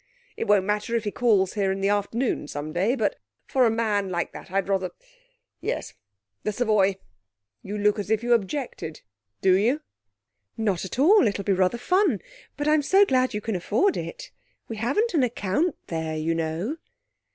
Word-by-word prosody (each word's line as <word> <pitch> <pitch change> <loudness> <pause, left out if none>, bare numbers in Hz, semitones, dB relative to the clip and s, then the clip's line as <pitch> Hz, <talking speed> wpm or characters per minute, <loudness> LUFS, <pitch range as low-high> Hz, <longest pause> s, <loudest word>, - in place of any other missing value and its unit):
It - - -3
won't 205 -2 +4
matter 210 +3 -1
if 230 - 0
he 205 - -2
calls 205 -6 +2
here 195 -3 +1
in 195 - -2
the 195 +1 +1
afternoon 205 - 0
some 150 +1 -5
day, 200 +9 +1
but 220 -5 -1 0.3
for 255 -3 +3
a - - +3
man 215 -3 0
like 175 -1 -2
that, - - -10
I'd 195 +1 0
rather 190 -2 0 0.7
yes - - -3 0.5
the 210 - -1
Savoy. 205 -4 +2 0.6
You 205 +2 -5
look 210 +1 +2
as 205 - -4
if 220 +1 +1
you 240 0 +3
objected. 230 - -2 0.4
Do 190 -1 +5
you?' 240 +10 +2 0.8
'Not 200 -5 0
at 190 - -6
all. 325 - +6
It'll 200 -1 -2
be 195 - +2
rather 185 +4 +2
fun. 360 - +2 0.4
But 290 +1 -2
I'm 305 0 +4
so 385 +8 +5
glad 255 - +1
you 210 - -2
can 220 -1 -2
afford 215 - +1
it. - - -6 0.4
We 225 - -6
haven't 280 - 0
an 310 - +3
account 245 - 0
there, 160 -1 -3
you 160 +2 0
know.' 165 - -2
210 Hz, 185 wpm, -25 LUFS, 190-245 Hz, 0.8 s, all